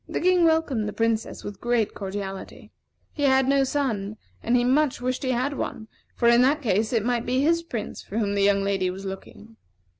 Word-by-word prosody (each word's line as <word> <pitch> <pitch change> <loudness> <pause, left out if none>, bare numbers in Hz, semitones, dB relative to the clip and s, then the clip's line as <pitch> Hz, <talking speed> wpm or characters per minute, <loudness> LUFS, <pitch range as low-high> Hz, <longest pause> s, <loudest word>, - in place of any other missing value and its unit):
The - - -2
King 360 -1 +3
welcomed 320 -9 +1
the - - -7
Princess 225 -1 -1
with 205 -1 -8
great 240 -3 0
cordiality. 195 -1 -7 0.4
He 295 - -6
had 265 -2 +3
no 275 0 +3
son, 225 -7 -2 0.2
and 240 +2 +2
he 240 - +2
much 270 +2 +2
wished 255 +1 -2
he 265 - -2
had 255 +3 0
one; 220 -4 -5 0.3
for 235 - +1
in 235 +1 +6
that 285 +4 +2
case 215 -1 +1
it 230 -3 0
might 240 -1 0
be 255 +1 +1
his 335 +3 +2
Prince 240 -11 -6
for 205 - -7
whom 205 -3 0
the 200 - 0
young 200 0 +3
lady 195 -2 0
was 190 +2 -7
looking. 205 +3 -9
235 Hz, 210 wpm, -25 LUFS, 205-265 Hz, 0.4 s, in